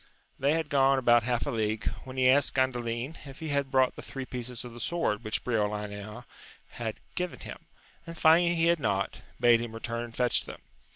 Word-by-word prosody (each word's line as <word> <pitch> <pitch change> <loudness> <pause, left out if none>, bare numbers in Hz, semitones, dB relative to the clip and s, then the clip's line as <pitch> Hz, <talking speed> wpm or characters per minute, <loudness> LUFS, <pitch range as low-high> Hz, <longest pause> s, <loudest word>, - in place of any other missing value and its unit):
They 140 +3 +3
had 160 -2 -1
gone 135 -1 +4
about 120 -2 +5
half 120 +1 -1
a - - -2
league, 110 -1 -1 0.2
when 130 0 -9
he 130 -1 +4
asked 135 +2 +4
Gandalin 125 +1 -1
if 135 0 -10
he 160 - -5
had 140 -1 0
brought 130 -1 +3
the - - -8
three 135 -1 -6
pieces 125 -1 -6
of 120 - -9
the 120 - -10
sword 145 -9 -1
which 110 -1 -2
Briolania 105 -2 -3 0.4
had 110 -2 -5
given 180 -1 -3
him, - - -9 0.4
and 165 0 -8
finding 170 +2 +5
he 165 0 +2
had 170 0 +3
not, 100 -6 -1 0.2
bade 120 -1 +5
him 120 -1 -5
return 115 +1 -4
and 115 -1 -12
fetch 125 -1 +2
them. - - -9
125 Hz, 205 wpm, -29 LUFS, 115-140 Hz, 0.4 s, about